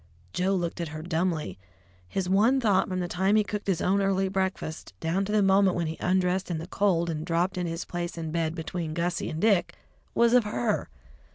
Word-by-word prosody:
Joe 190 +2 +1
looked 175 -1 -2
at 170 - -2
her 155 0 -7
dumbly. 160 - -1 0.5
His 185 - -2
one 215 +8 +4
thought 205 -6 +2
from 185 -1 -1
the 175 - -2
time 190 +4 +1
he 215 - +4
cooked 205 +1 -5
his 185 -4 0
own 195 +2 +2
early 195 -1 +1
breakfast, 190 - -3
down 175 +5 0
to 205 - -4
the 210 -1 +3
moment 195 -1 +4
when 170 - 0
he 160 +1 -4
undressed 185 +1 +1
in 170 - -1
the 160 - -5
cold 180 -2 +1
and 155 -2 -3
dropped 170 +3 0
into 180 -2 -2
his 165 +1 -4
place 175 -1 -4
in 160 -1 -4
bed 165 0 -1
between 160 -1 -4
Gussie 170 +1 -1
and 155 - -4
Dick, 200 -2 +2 0.4
was 235 0 +4
of 250 -1 +6
her. 210 +1 -1
180 Hz, 215 wpm, -27 LUFS, 165-195 Hz, 0.5 s, of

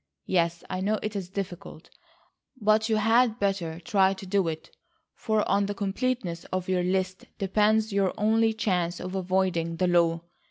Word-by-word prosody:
Yes, 170 -2 0
I 185 - -3
know 210 +3 +1
it 215 0 -3
is 190 -3 -4
difficult, 185 -4 -7 0.7
but 215 +1 +2
you 220 - +3
had 225 +2 +3
better 190 -6 -1
try 195 -2 +2
to 195 0 -9
do 190 -1 +1
it 160 -1 -6 0.4
for 220 -2 0
on 200 0 +2
the 205 - -3
completeness 200 -3 -2
of 185 -1 -3
your 185 -1 +1
list 185 +1 -1
depends 215 +2 +2
your 195 -2 +2
only 225 +2 +3
chance 180 -5 -1
of 185 +1 -6
avoiding 185 -3 0
the 180 - 0
law. 170 -2 +2
190 Hz, 165 wpm, -27 LUFS, 180-215 Hz, 0.7 s, you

